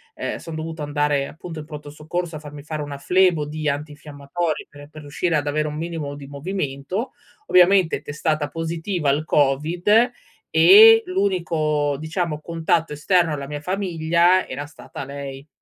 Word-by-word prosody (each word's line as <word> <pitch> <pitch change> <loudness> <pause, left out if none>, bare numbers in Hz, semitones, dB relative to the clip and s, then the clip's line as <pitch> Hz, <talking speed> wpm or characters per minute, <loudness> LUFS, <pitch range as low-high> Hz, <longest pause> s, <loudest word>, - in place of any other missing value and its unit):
Ehm, - - -4
son 165 -1 -8
dovuto 160 0 -5
andare 145 -1 0
appunto 160 0 -9
in 150 - -8
Pronto 150 -1 -9
Soccorso 165 +3 -4
a - - -8
farmi 145 -1 -10
fare 155 0 -5
una 145 -1 -6
flebo 180 0 +2
di 150 0 -3
antinfiammatori 150 +2 -4
per 145 0 -13
per 155 0 -11
riuscire 155 +3 -1
ad 145 - 0
avere 150 +1 0
un 150 - -5
minimo 160 -3 -4
di 145 - -10
movimento. 145 - -4 0.4
Ovviamente 180 -1 +4
testata 155 0 -2
positiva 165 +1 -2
al 145 +3 +1
COVID 165 - +3 0.4
e 210 +8 +8
l'unico, 165 -6 0
diciamo, 160 -1 -3
contatto 165 -1 0
esterno 165 +2 +2
alla 140 -1 -5
mia 145 0 -6
famiglia 175 0 +2
era 140 +3 -5
stata 145 -1 -9
lei. 140 0 -8
155 Hz, 155 wpm, -22 LUFS, 145-175 Hz, 0.4 s, e